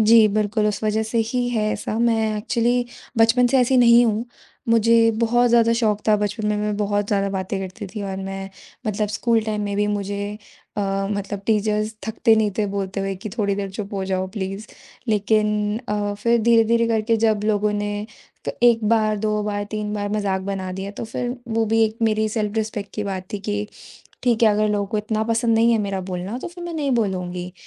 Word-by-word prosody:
जी, 220 0 +7
बिल्कुल 210 0 +1
उस 210 +1 -2
वज़ह 215 +1 +1
से 235 - 0
ही 245 -1 0
है 225 -3 0
ऐसा 220 - -3
मैं 235 -1 +3 0.2
ऐक्चुअली 240 +3 +1 0.3
बचपन 230 +2 +5
से 265 +2 +3
ऐसी 255 +1 +3
नहीं 240 0 +7
हूँ। 220 +2 0 0.4
मुझे 230 0 +5
बहुत 240 +1 +3
ज़्यादा 230 -1 +4
शौक 215 -3 +1
था। 210 - +5
बचपन 210 +1 -2
में 210 - +1
मैं 210 0 -1
बहुत 205 -1 0
ज़्यादा 200 -1 +1
बातें 190 0 -3
करती 195 +2 -6
थी 210 - -4
और 195 -1 -4
मैं 195 0 -5 0.4
मतलब 210 0 -1
स्कूल 225 +2 +1
टाइम 215 -1 -2
में 200 -1 -2
भी 205 0 +2
मुझे 200 -1 -2 0.6
अ, - - 0 0.3
मतलब 200 -1 -3
टीचर्स 215 0 +1
थकते 220 0 +3
नहीं 215 -1 +2
थे 210 - +2
बोलते 195 0 -2
हुए 195 0 -2
कि 215 - -4
थोड़ी 200 -2 +1
देर 195 -1 -4
चुप 200 +1 -6
हो 195 -1 -2
जाओ 190 0 -1
प्लीज़ 195 +2 -4 0.4
लेकिन 210 0 +2 0.4
अ, 205 -1 -1
फ़िर 235 +3 +2
धीरे-धीरे, 230 0 +4
करके 225 0 +1
जब 215 -2 +2
लोगों 210 -1 +1
ने 205 0 -3 0.4
तो - - -2
1 230 -2 +4
बार, 215 -2 +2
2 210 0 0
बार, 205 -1 -2
3 210 -1 -3
बार 205 -1 -2
मज़ाक 200 -3 0
बना 190 -1 -4
दिया 190 +2 -5
तो 210 - -6
फ़िर 245 +3 -4 0.2
वो 225 0 +2
भी 225 +1 +3
एक 220 +1 -2
मेरी 215 -1 +2
सेल्फ 210 -1 -2
रिस्पेक्ट 215 -2 -3
की 210 - -3
बात 190 -2 -4
थी 205 - -2
कि 205 0 -2 0.6
ठीक 240 -2 +2
है, 220 - +7
अगर 210 0 +2
लोगों 205 -1 0
को 210 +2 -2
इतना 215 0 -1
पसंद 230 0 +1
नहीं 230 +1 +4
है 225 - +3
मेरा 195 -2 -2
बोलना 185 +4 -4
तो - - -6
फ़िर 350 0 -10
मैं 345 - -5
नहीं 285 -3 -1
बोलूँगी। 180 -5 -2
210 Hz, 210 wpm, -22 LUFS, 205-225 Hz, 0.6 s, जी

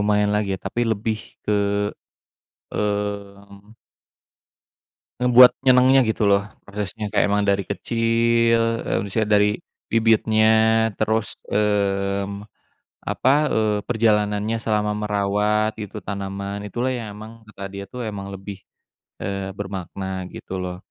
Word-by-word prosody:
lumayan 105 0 +2
lagi 105 -1 0
ya - - -14
tapi 120 - -2
lebih 110 +1 -2 0.3
ke, 100 -1 +1 1.1
mmm 100 0 -4 1.5
ngebuat 125 0 +8
nyenengnya 130 +1 +5
gitu 110 -1 0
loh, 100 0 +4 0.2
prosesnya 105 +1 -5
kayak - - +3
emang 105 0 +1
dari 100 0 +2
kecil, 115 +1 +1
eee, - - -1
maksudnya 110 +2 -1
dari 105 0 +4 0.4
bibitnya, 110 -1 +3 0.5
terus, 110 -1 -1
mmm, 100 -1 0 0.6
apa, 130 - +2 0.2
eee, 110 -1 +1
perjalanannya 105 -1 +1
selama 105 -1 -1
merawat 105 +1 0
itu 105 -3 -7
tanaman, 100 +1 -5
itulah 120 +6 -2
yang 115 -5 -4
emang 110 +1 -12
kata 105 -2 -11
dia 100 +1 -7
itu 125 +6 -8
emang 100 -3 -5
lebih, 95 0 -8 0.6
eee, 100 0 -4
bermakna, 95 -1 -5
gitu 95 0 -6
loh. 90 0 -5
105 Hz, 120 wpm, -22 LUFS, 100-110 Hz, 1.5 s, ngebuat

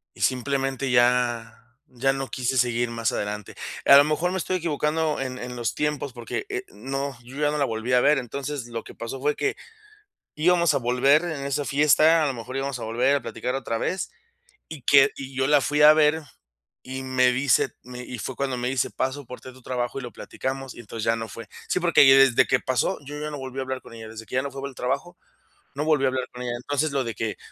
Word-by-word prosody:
"y - - -16
simplemente 135 +1 0
ya 120 -2 +2 0.4
ya 135 +2 +2
no 135 -1 -4
quise 130 0 -1
seguir 120 -1 +1
más 115 -2 -1
adelante". 105 0 -4 0.3
A 140 - +9
lo 140 - +7
mejor 155 +4 0
me 190 - -2
estoy 185 +1 -1
equivocando 155 -1 -1
en 130 -1 -4
en 125 0 -6
los 120 -1 -2
tiempos, 150 -3 -2
porque, 120 - -4
eh, 390 -1 -4
no, 135 - -4
yo 125 +3 -12
ya 150 0 +2
no 150 - -2
la 140 - +2
volví 115 +2 -3
a 125 - +5
ver. 145 +2 +4
Entonces, 135 +1 -4
lo 115 -1 -5
que - - -12
pasó 115 +3 -6
fue 150 +2 +1
que 415 - -1 0.8
íbamos 170 +2 +3
a - - +2
volver 135 +5 +3
en 155 -5 -4
esa 140 +1 -1
fiesta, 155 +3 +4
a - - +2
lo 135 - -1
mejor 125 +2 -8
íbamos 135 -1 -3
a - - -6
volver 125 +5 +2
a - - -6
platicar 125 +1 -4
otra 120 -4 -2
vez, 185 +10 -2 0.6
y 155 -4 -9
que 140 +1 +6
y 135 -1 -8
yo 130 0 +2
la 145 -1 +5
fui 150 +2 +1
a 150 0 +10
ver, 155 +1 +3 0.6
y 130 +1 -5
me 130 -1 +3
dice, 130 +1 +2
me 125 0 -9
y 125 -1 -7
fue 130 - -5
cuando 135 -2 -1
me 125 0 -2
dice: 135 0 0
"paso 130 +1 -3
por 125 - -9
ti - - -11
a - - -15
tu 130 0 -17
trabajo 120 0 -3
y - - -5
lo 120 -2 -7
platicamos", 135 -1 -5
y - - -9
entonces 115 0 -6
ya 115 - +3
no 115 0 -5
fue. 115 +1 -9 0.2
Sí, - - +1
porque 170 -2 +5
desde 135 -2 +6
que 130 - +3
pasó, 130 -2 0
yo 145 +2 -7
ya 150 0 -4
no 145 - -6
volví 130 0 -7
a 135 - 0
hablar 130 0 -4
con - - -13
ella, 110 -1 -9
desde 110 0 -9
que - - -10
ya 130 - +2
no 140 - -4
fue 135 - -7
por 140 - -4
el - - -16
trabajo, 140 +8 -3 0.6
no 145 +2 -2
volví 155 -3 +2
a - - +4
hablar 130 -1 -2
con 125 - -8
ella. 120 -1 -3
Entonces, 145 +5 -1
lo 135 -2 0
de 115 -1 -4
que 110 -2 -3
135 Hz, 245 wpm, -25 LUFS, 125-145 Hz, 0.8 s, a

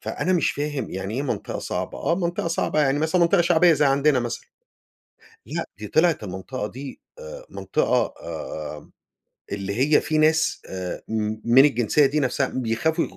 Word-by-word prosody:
فأنا 185 - -2
مش 175 - +2
فاهم 145 -4 -3
يعني 95 +3 -4
إيه 135 - -1
منطقة 145 - -3
صعبة؟ - - -4
آه 170 - +1
منطقة 170 -1 -2
صعبة 165 -2 0
يعني 140 -1 +2
مثلًا 160 +4 +1
منطقة 170 +2 +4
شعبية 175 0 +5
زي 150 -1 +2
عندنا 140 0 +3
مثلًا، 120 -1 -5 1.0
لأ - - -3
دي 105 0 -7
طلعت 160 - +2
المنطقة 100 +5 -5
دي 135 +5 -9 0.2
آآ - - -9
منطقة - - 0
آآ، - - -7 0.6
اللي 100 0 -3 0.2
هي - - +4
في 155 - -1
ناس 155 +1 +2
آآ 90 -1 -5
م 110 -1 -1
من 125 +4 +7
الجنسية 135 +1 +3
دي 150 +3 0
نفْسها 135 0 +1
بيخافوا 130 +7 0
يغ - - -10
145 Hz, 170 wpm, -23 LUFS, 115-160 Hz, 1.0 s, من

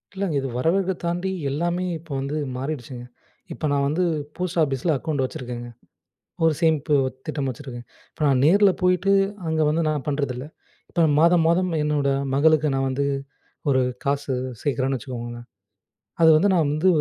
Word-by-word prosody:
இல்லங்க. 190 -6 -1
இது 135 - -3
வரவேற்க 180 +8 +1
தாண்டி 175 +3 -1 0.2
எல்லாமே 175 +5 -1 0.2
இப்ப 165 -2 -15
வந்து 140 +3 -3 0.2
மாறிடுச்சுங்க. 130 -3 -5 0.5
இப்ப - - -13
நான் 140 -1 +2
வந்து 160 +5 0 0.3
போஸ்ட் 180 -1 -2
ஆஃபீஸில 145 +2 +1
அக்கவுண்ட் 145 -1 -2
வச்சிருக்கேங்க. 120 -2 -6 0.8
ஒரு 160 - +5
சேமிப்பு 155 -2 +2 0.3
திட்டம் 140 -2 -2
வச்சுருக்கேன். 125 -2 -7 0.3
இப்ப - - -27
நான் 135 -3 +3
நேர்ல 200 +6 +6
போயிட்டு, 180 +2 +3 0.4
அங்க 160 0 0
வந்து 160 +2 +1
நான் 150 -4 -1
பண்ணுறதில்ல. 140 -3 -2 0.4
இப்ப 170 - +2 0.2
மாதம் 170 0 +5
மாதம் 180 +2 +2
என்னோட 150 -2 +1 0.2
மகளுக்கு 155 +1 +4
நான் 135 0 0
வந்து 140 +2 -1 0.7
ஒரு 130 -1 +3 0.2
காசு 140 0 -1 0.3
சேர்க்குறேன்னு 135 -1 0
வச்சுக்கோங்களேன். 120 -2 -7 0.8
அது 160 - +7
வந்து 195 +6 +4
நான் 170 -3 +3
வந்து 155 +5 +1
150 Hz, 150 wpm, -23 LUFS, 135-170 Hz, 0.8 s, அது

